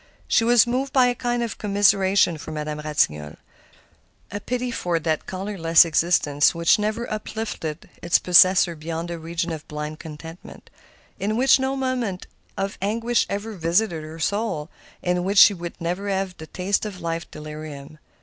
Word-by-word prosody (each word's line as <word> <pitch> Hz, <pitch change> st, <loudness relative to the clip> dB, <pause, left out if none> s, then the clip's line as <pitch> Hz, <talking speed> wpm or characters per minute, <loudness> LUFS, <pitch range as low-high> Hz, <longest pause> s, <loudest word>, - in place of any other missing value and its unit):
She -, -, +3 dB
was 240 Hz, -1 st, +5 dB
moved 260 Hz, +3 st, -2 dB
by 260 Hz, -2 st, +5 dB
a 245 Hz, -, +2 dB
kind 240 Hz, -1 st, -2 dB
of 230 Hz, -, -5 dB
commiseration 195 Hz, -4 st, +3 dB
for -, -, -9 dB
Madame 150 Hz, -1 st, -4 dB
Ratignolle,—a 75 Hz, -, -5 dB
pity 250 Hz, +3 st, -3 dB
for 175 Hz, -6 st, -1 dB
that 160 Hz, -1 st, -2 dB
colorless 185 Hz, -4 st, +3 dB
existence 160 Hz, -3 st, +2 dB
which 170 Hz, +4 st, +3 dB
never 215 Hz, +3 st, -2 dB
uplifted 210 Hz, -7 st, -5 dB
its 170 Hz, -, +3 dB
possessor 180 Hz, 0 st, +5 dB
beyond 165 Hz, +2 st, -5 dB
the 170 Hz, -1 st, -5 dB
region 170 Hz, +1 st, -3 dB
of 155 Hz, -2 st, -7 dB
blind 150 Hz, +1 st, -6 dB
contentment, 160 Hz, +2 st, -11 dB, 0.5 s
in 210 Hz, +3 st, -1 dB
which 265 Hz, +2 st, +5 dB
no 265 Hz, +1 st, -1 dB
moment 250 Hz, -8 st, -2 dB, 0.3 s
of 195 Hz, +1 st, -3 dB
anguish 230 Hz, +4 st, 0 dB
ever 205 Hz, +3 st, -4 dB
visited 170 Hz, 0 st, 0 dB
her 155 Hz, +1 st, -9 dB
soul, 165 Hz, -3 st, -2 dB, 0.3 s
in 180 Hz, 0 st, 0 dB
which 200 Hz, +2 st, -1 dB
she 205 Hz, -, +9 dB
would 175 Hz, -2 st, -8 dB
never 180 Hz, +4 st, -3 dB
have 190 Hz, -2 st, -2 dB
the 160 Hz, -, -10 dB
taste 190 Hz, +4 st, -1 dB
of 205 Hz, -4 st, -6 dB
life's 165 Hz, -1 st, -4 dB
delirium. 150 Hz, -1 st, -9 dB
180 Hz, 160 wpm, -23 LUFS, 160-210 Hz, 0.5 s, she